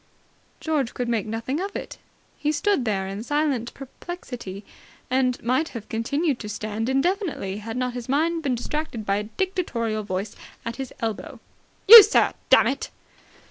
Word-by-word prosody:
George 295 -7 -1
could 245 - -2
make 230 -3 -1
nothing 230 +7 -3
of 395 +2 -4
it. - - -6 0.4
He 295 - -1
stood 305 -2 +1
there 195 -3 -1
in 195 +2 -5
silent 280 -3 -1
perplexity, 250 - -8 0.5
and 255 -1 +1
might 260 +7 +1
have 215 - -10
continued 280 +5 -1
to 210 - -6
stand 215 +2 -3
indefinitely, 280 - -1
had 225 +3 -6
not 250 -1 -1
his 245 0 -7
mind 325 +4 +1
been 270 -5 0
distracted 245 -2 -4
by 195 0 +1
a 210 - -2
dictatorial 235 - -2
voice 200 +1 -4 0.3
at 230 +1 -4
his 265 -2 -5
elbow. 225 -2 -4 0.5
"You, 455 +2 +14
sir! 420 +3 +3 0.2
Dammit!" - - +3
250 Hz, 155 wpm, -24 LUFS, 220-305 Hz, 0.5 s, You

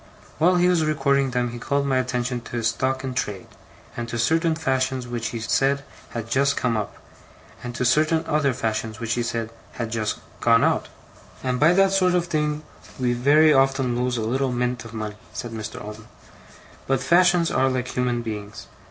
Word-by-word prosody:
While 175 +3 +4
he 175 0 +4
was 175 -3 +3
recording 140 -3 +2
them 125 -1 -1
he 120 - -7
called 140 +3 0
my 135 -2 +2
attention 125 -1 -2
to - - -13
his 115 -1 +1
stock 130 +3 -1
in 130 -1 -3
trade, 105 -6 -3 0.5
and 120 0 -4
to 120 - -3
certain 160 +7 +2
fashions 130 -4 -1
which 120 -2 -3
he 115 +1 -4
said 135 +5 +1 0.3
had 115 -2 -5
'just 140 +3 +2
come 120 -2 +1
up', 105 -2 -3 0.7
and 120 -1 -6
to 125 - -1
certain 155 +5 +3
other 150 -2 +1
fashions 110 -2 -3
which 115 0 -1
he 120 - 0
said 115 -1 -3 0.2
had 115 -2 -4
'just 110 -2 -1 0.2
gone 115 -1 +4
out'. - - +1 0.6
'And 125 -1 -1
by 155 +4 +5
that 195 +1 +4
sort 185 -2 +3
of 175 -1 +1
thing 150 -2 -1 0.4
we 125 -1 +1
very 150 +5 +5
often 135 -2 +2
lose 125 0 0
a - - -1
little 130 +4 0
mint 125 -1 -2
of 115 0 -10
money,' 105 -1 -5 0.2
said 120 - -5
Mr. 110 -1 -6
Omer. 105 +1 -9 0.8
'But 135 -1 +1
fashions 175 +2 +4
are 130 0 +2
like 125 -1 -2
human 125 -1 -1
beings. 105 -2 -6
125 Hz, 195 wpm, -23 LUFS, 115-145 Hz, 0.8 s, by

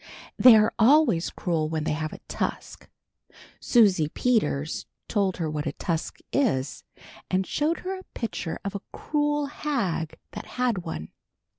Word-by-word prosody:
They 250 -3 +9
are 215 0 +4
always 235 - +5
cruel 160 -4 -1
when 160 -1 -2
they - - -1
have 155 0 -3
a - - -8
tusk." - - -4 0.7
Susie 195 - +4
Peters 165 - 0 0.2
told 200 -4 0
her 165 -3 -1
what 150 0 -3
a 145 - -2
tusk 165 -2 -3 0.2
is, 140 - 0 0.5
and 185 +1 +1
showed 310 - 0
her 380 +1 -4
a - - -12
picture 220 -8 -3
of 200 - -2
a 200 - -4
cruel 295 -1 0
hag 235 - -2
that - - -8
had 245 -6 +1
one. 160 - -6
195 Hz, 150 wpm, -26 LUFS, 160-255 Hz, 0.7 s, They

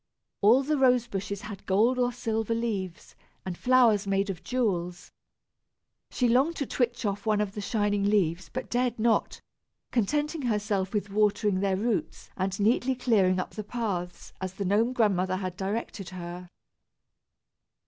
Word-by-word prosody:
All 230 +7 +6
the 300 +1 0
rose 250 -2 +4
bushes 200 -2 -4
had 205 -2 -8
gold 225 +7 +3
or 245 0 +2
silver 230 -2 -2
leaves, 200 -7 -4 0.3
and 185 -2 -4
flowers 235 -3 +4
made 195 0 +1
of 175 - -9
jewels. 180 -9 -2 1.0
She 250 - +1
longed 265 +8 +3
to 280 - -2
twitch 240 -2 -1
off 205 +1 -2
one 215 -1 +3
of 210 -2 -1
the 210 0 -6
shining 205 -1 0
leaves, 185 -4 +1
but 255 - -4
dared 245 -1 0
not, 225 0 +1 0.5
contenting 295 - 0
herself 210 -5 -1
with 205 -2 -2
watering 205 -1 +2
their 195 -1 +1
roots 220 +1 -2
and 190 +1 -2
neatly 245 +5 +2
clearing 200 -7 +2
up - - -4
the 215 - -6
paths, 195 -6 -4
as 190 0 -4
the 200 - -3
Gnome 215 +6 +2
Grandmother 190 -6 +1
had 185 -1 -4
directed 195 0 -4
her. 175 0 -8
210 Hz, 155 wpm, -28 LUFS, 190-240 Hz, 1.0 s, All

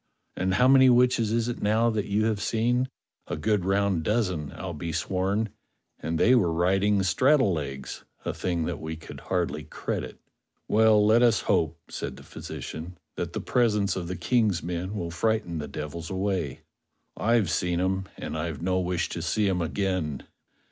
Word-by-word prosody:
And 95 +1 0
how 125 +6 +5
many 130 -1 +7
witches 120 -3 +4
is 115 0 +1
it 120 - -4
now 110 +3 +3
that 105 -2 -1
you 105 +2 +1
have 110 -2 0
seen.^ 120 +3 +1 0.4
A - - -3
good 105 -4 +1
round 95 -2 +2
dozen, 90 -6 -1
I'll 95 -2 -5
be 85 +2 -4
sworn; 95 +6 0 0.5
and 80 +1 -2
they 125 - +5
were 100 -10 +4
riding 95 +4 +2
straddle 130 +3 +3
legs, 70 -4 -5 0.2
a - - -1
thing 85 -3 -1
that - - -3
we 80 0 -5
could 80 - -10
hardly - - -2
credit." - - -5 0.5
"Well, 110 -1 +5
let 110 +3 +5
us 120 -3 +4
hope," 85 -5 +1
said - - -5
the - - -12
physician, 85 +4 -7 0.2
"that - - -4
the - - -3
presence 105 -5 +1
of 90 -2 -4
the 90 - -3
Ejng's 105 -2 +1
men 90 +4 -3
will 85 -4 -3
frighten 100 -2 0
the 75 - -4
devils 80 +2 -6
away. 95 -6 -2 0.5
I've 110 -6 +2
seen 90 -1 0
'em, 95 +1 0
and - - -5
I've 80 -2 -3
no 95 +1 0
wish 90 -2 -1
to 85 - -4
see 100 +5 +1
'em 90 -2 +1
again." 85 -4 -2
95 Hz, 175 wpm, -27 LUFS, 85-110 Hz, 0.5 s, many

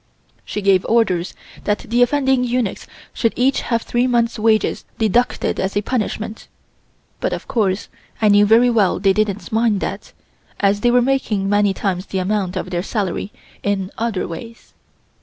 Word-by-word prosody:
She 210 - -5
gave 195 -1 +4
orders 190 -7 +1 0.3
that 210 0 +1
the 240 +2 +1
offending 265 0 +3
eunuchs 245 -4 -2 0.3
should 230 - 0
each 260 +3 +2
have 230 -2 -1
three 240 +1 0
months' 235 -2 +1
wages 220 0 +2
deducted 235 +3 +1
as 190 +1 -1
a 205 - 0
punishment, 220 -2 -3 0.7
but - - -1
of - - -6
course 200 -5 0 0.3
I 215 - +3
knew 205 0 +5
very 235 +3 +5
well 210 -7 +2
they 195 0 +3
didn't 210 -1 -1
mind 220 -2 +2
that, - - -5 0.5
as 200 0 +2
they 240 - +3
were 245 0 +4
making 235 -7 0
many 205 0 +3
times 190 -1 -2
the 195 - -3
amount 190 0 -1
of 185 - -4
their 175 -1 -1
salary 200 0 -3 0.3
in 195 -2 -1
other 225 -4 -2
ways. 230 +7 -10
215 Hz, 165 wpm, -19 LUFS, 195-235 Hz, 0.7 s, knew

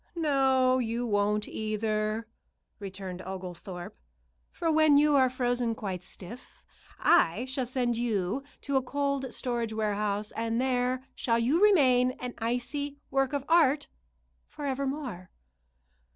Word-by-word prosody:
"No, 265 -5 +3
you 235 0 -1
won't, 210 -1 +1
either," 215 0 -2 0.5
returned 190 -2 -6
Oglethorpe; 180 -1 -7 0.6
"for 330 -1 -1
when 310 -2 +5
you 295 0 +4
are 260 -2 +5
frozen 245 -2 0
quite 190 -5 -4
stiff, 205 +7 -12 0.4
I 205 +10 +3
shall 260 -1 -3
send 245 -2 0
you 220 -1 -1 0.2
to 280 -1 0
a - - +3
cold 280 0 -2
storage 235 -2 -2
warehouse, 210 -1 -1
and 230 +1 -1
there 255 0 0
shall 230 -2 0
you 260 +10 +2
remain 255 -11 +5
an 250 -1 -6
icy 250 +5 -2
work 270 -1 +1
of 285 -2 -2
art 305 -4 +3 0.6
forever 280 -2 -3
more." 255 -11 -5
245 Hz, 125 wpm, -29 LUFS, 215-270 Hz, 0.6 s, when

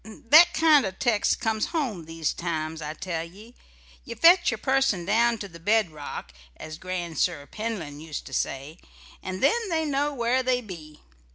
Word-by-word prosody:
That 300 +10 +5
kind 315 -3 +5
o' 195 - -1
text 210 +2 0
comes 220 -2 -1
home 250 - -3
these 165 -1 -3
times, 160 -2 -4
I 150 +1 -5
tell 165 -2 -4
ye. 205 +8 -14 0.5
You - - -8
fetch 345 +3 +5
a - - -3
person 265 -10 +1
down 230 +4 +2
to 205 - -7
the 170 -3 -13
bedrock, 165 - -2 0.2
as 155 0 -9
Grandsir 175 -4 -2
Penlyn 175 -6 -5
used 155 -1 -7
to 135 - -11
say, 140 +6 -3 0.4
and 185 0 -5
then 460 -2 +2
they 320 -2 0
know 290 0 0
where 250 -1 0
they 255 -1 +1
be. 165 -9 -11
195 Hz, 170 wpm, -25 LUFS, 160-250 Hz, 0.5 s, That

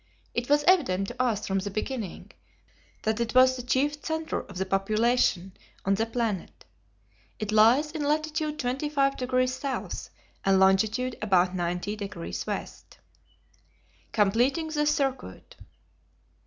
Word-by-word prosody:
It 240 +2 -2
was 295 0 +4
evident 195 - +3
to 255 - -4
us 225 -5 0
from 195 0 0
the 200 +2 -4
beginning 215 0 -5 0.7
that 220 +1 0
it 235 +1 -2
was 255 0 +6
the 250 - -5
chief 285 +4 0
centre 320 0 -2
of 190 -1 -5
population 195 -1 +1 0.3
on 195 - +3
the 220 +3 0
planet. 225 -5 -3 0.7
It 215 -1 -4
lies 235 +8 +5
in 310 -2 -4
latitude 305 +1 -1
25 275 +1 0
degrees 255 0 +1
South 270 +1 -4 0.3
and 195 -1 +4
longitude 215 +6 +2
about 185 -3 +3
90 180 +3 -2
degrees 200 -4 -5
west. - - -6 1.1
Completing 245 +10 +2
the 300 -1 0
Circuit. 275 -3 -2
240 Hz, 130 wpm, -27 LUFS, 195-275 Hz, 1.1 s, was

